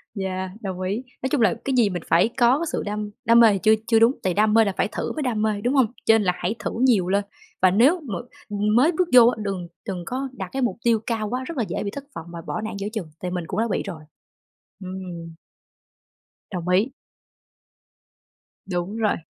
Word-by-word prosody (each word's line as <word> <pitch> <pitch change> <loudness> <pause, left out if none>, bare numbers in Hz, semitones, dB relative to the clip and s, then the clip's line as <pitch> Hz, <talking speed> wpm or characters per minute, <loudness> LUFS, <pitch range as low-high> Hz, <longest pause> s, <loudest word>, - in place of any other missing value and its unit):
Yeah, 190 -1 -3
đồng 185 -2 -5
ý. 200 +7 -2 0.2
Nói 260 - -1
chung 285 -6 +1
là 200 -6 +4
cái 270 -2 0
gì 220 -4 +4
mình 175 -3 -4
phải 170 +7 +4
có 245 +2 +5
cái 335 - -1
sự - - -2
đam 210 0 -3 0.2
đam 230 +1 +6
mê 230 - +8
thì - - 0
chưa 220 - +6
chưa 225 -1 +4
đúng, 230 +2 +6
tại 185 -2 +1
đam 210 +2 +3
mê 225 -1 +6
là 200 - -1
phải - - +2
thử - - -3
mới 310 - -4
đam 225 -4 -1
mê, 215 -2 0
đúng 245 +5 0
hông? 265 -4 +5 0.2
Cho 225 - +6
nên 210 - 0
là 180 -1 +2
hãy 190 +6 -2
thử - - -3
nhiều 200 -8 +3
lên 200 +2 +1 0.4
và 185 -1 +5
nếu 270 - +4
mà 225 -10 -5 0.3
mới 210 +9 +3
bước 355 +1 0
vô 240 -2 +9
á, 245 - +2
đừng 190 -3 -3 0.2
đừng 180 -3 -4
có 265 +4 -3
đặt 190 -8 -7
cái 270 - -2
mục 220 -7 0
tiêu 230 -2 +3
cao 220 -3 -2
quá, 255 +2 -2
rất 315 +2 -7
là 235 - +1
dễ - - -3
bị 200 - -3
thất 280 +3 -7
vọng 165 - -6
và 170 - -6
bỏ 215 - -3
nản 215 - -4
giữa 200 - -3
chừng, 200 -8 -4
tại 180 -1 -3
mình 180 -2 -2
cũng 200 +2 -3
đã 230 - +1
bị - - 0
rồi, 175 -6 -7 0.8
ừm. 180 -3 -7 1.2
Đồng 180 -1 -4
ý. 200 +8 +3 1.8
Đúng 185 +3 -3
rồi, 215 -2 +1
210 Hz, 235 wpm, -23 LUFS, 185-235 Hz, 1.8 s, vô